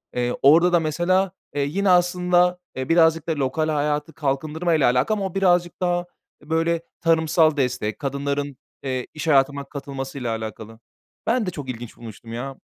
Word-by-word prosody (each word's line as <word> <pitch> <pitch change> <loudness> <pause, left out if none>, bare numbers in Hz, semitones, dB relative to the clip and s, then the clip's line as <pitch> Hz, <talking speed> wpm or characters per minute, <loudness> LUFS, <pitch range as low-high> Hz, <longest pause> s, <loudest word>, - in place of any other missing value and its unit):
Eee, 125 0 0
orada 170 +6 +6
da, 175 - +5
mesela, 175 +4 +1 0.2
eee, 145 - 0
yine 195 +6 0
aslında, 180 0 +3 0.2
eee, 130 +2 -4
birazcık 165 -1 +4
da 160 - 0
lokal 145 +3 -1
hayatı 150 +1 -1
kalkındırmayla 155 +1 +1
alakalı 165 - +1
ama 195 - -2
o 190 - -5
birazcık 175 -2 +2
daha, 175 0 0 0.4
eee, 150 - -18
böyle, 165 +1 +1 0.2
tarımsal 160 -1 +3
destek, 125 -5 -1
kadınların, 140 0 -3 0.3
eee, 130 -2 -3
iş 155 +1 -5
hayatına 140 -1 +3
katılmasıyla 135 -4 -5
alakalı. 110 0 -8 0.5
Ben 235 0 +2
de 180 - -2
çok 140 -5 -7
ilginç 120 -1 -7
bulmuştum, 115 0 -10
ya. 135 +3 -5
155 Hz, 160 wpm, -23 LUFS, 135-175 Hz, 0.5 s, orada